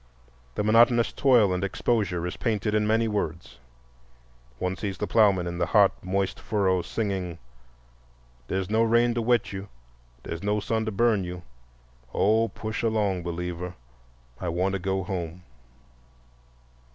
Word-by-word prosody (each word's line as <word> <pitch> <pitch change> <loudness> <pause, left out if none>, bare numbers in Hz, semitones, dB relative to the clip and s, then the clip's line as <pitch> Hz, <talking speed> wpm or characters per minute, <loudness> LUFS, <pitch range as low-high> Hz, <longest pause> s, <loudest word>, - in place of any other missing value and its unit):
The - - -1
monotonous 115 +2 +4
toil 120 -8 +4
and 90 +1 -2
exposure 100 -3 0
is 90 - -4
painted 110 -2 -1
in 105 0 +2
many 115 +1 +2
words. 85 -9 -4 1.0
One 90 +7 -2
sees 95 +1 -4
the - - -2
ploughmen 100 -5 +3
in 85 0 -4
the 85 - +1
hot, 100 -3 +5
moist 95 +1 -1
furrow, 95 -5 +1
singing: 95 -5 -3 1.1
"Dere's 95 -1 -2
no 110 +3 +2
rain 115 +1 +3
to 120 - -1
wet 120 -2 +1
you, 95 +1 -6 0.5
Dere's 85 - -5
no 105 +1 0
sun 110 +2 -1
to 110 - -2
burn 110 -1 +2
you, 90 0 -6 0.7
Oh, 110 +3 +3
push 110 -1 -5
along, 105 -5 0
believer, 90 +1 -4 0.6
I 90 - -3
want 90 +3 0
to 100 - -1
go 95 +1 -1
home." 90 -1 -5
100 Hz, 145 wpm, -26 LUFS, 90-110 Hz, 1.1 s, hot